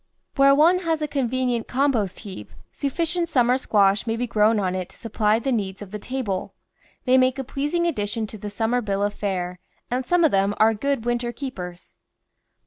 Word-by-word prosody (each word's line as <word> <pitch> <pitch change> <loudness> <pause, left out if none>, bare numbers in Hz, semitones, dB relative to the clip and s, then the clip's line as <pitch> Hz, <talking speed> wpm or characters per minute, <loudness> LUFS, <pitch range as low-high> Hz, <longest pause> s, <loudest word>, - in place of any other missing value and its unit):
Where 275 0 +6
one 335 +5 +5
has 325 -3 -1
a - - 0
convenient 255 -4 -1
compost 245 -8 0
heap, 200 -4 -9 0.2
sufficient 335 +4 -1
summer 250 -4 +3
squash 200 -2 +2
may 225 - 0
be 245 +2 -1
grown 215 -1 +3
on 185 -2 0
it 185 -1 -4
to - - -18
supply 215 -2 +1
the 250 +4 -2
needs 195 -5 -2
of 205 -2 -9
the 210 - -5
table. 225 -5 -4 0.5
They 260 0 +5
make 255 +1 +2
a 270 - -2
pleasing 295 +6 -1
addition 220 -7 -1
to 215 0 -10
the 210 - -5
summer 225 +4 0
bill 200 -2 -1
of 205 0 0
fare, 180 -3 -3 0.3
and 255 +1 0
some 350 +6 +2
of 320 - +4
them 195 +1 +2
are 220 +1 +5
good 275 +1 -1
winter 240 0 -1
keepers. 185 -10 -8
235 Hz, 195 wpm, -23 LUFS, 205-275 Hz, 0.5 s, Where